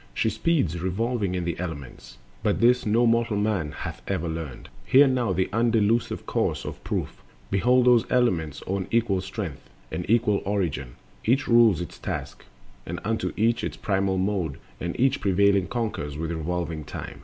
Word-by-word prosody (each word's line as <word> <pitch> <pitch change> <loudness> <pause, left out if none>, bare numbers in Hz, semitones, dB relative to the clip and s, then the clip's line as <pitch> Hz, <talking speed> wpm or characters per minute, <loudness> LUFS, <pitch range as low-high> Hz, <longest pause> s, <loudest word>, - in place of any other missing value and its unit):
She 110 - +1
speeds 135 - 0
revolving 100 +1 -1
in 90 -1 -2
the 85 -1 -3
elements, 75 -7 -7 0.2
But 105 -1 +1
this 125 0 +4
no 115 +3 +3
mortal 115 -2 +2
man 100 -8 0
hath - - -6
ever 85 - -1
learned— 80 -4 -6 0.2
Hear 135 - +6
thou 125 -5 +1
the 95 0 +1
undelusive 115 0 +1
course - - -1
of - - -7
proof: - - -3 0.3
Behold 125 +5 +3
those 125 -2 +4
elements 85 - +1
own 95 0 -2
equal 110 -5 +1
strength 95 -5 -6 0.2
And 90 - -4
equal 110 -3 +3
origin; 85 -11 -2 0.3
each 130 +5 +2
rules 115 -7 +5
its 90 - -7
task; - - -5 0.4
And - - -5
unto 110 +2 -1
each 115 +2 +2
its - - -3
primal 95 -1 0
mode; 95 -6 -1 0.2
and 85 0 -4
each 135 +2 +2
Prevailing 100 -1 +3
conquers 100 -11 -3
with 80 +1 -3
revolving 85 -1 -3
time. 70 0 -8
100 Hz, 165 wpm, -25 LUFS, 85-115 Hz, 0.4 s, Hear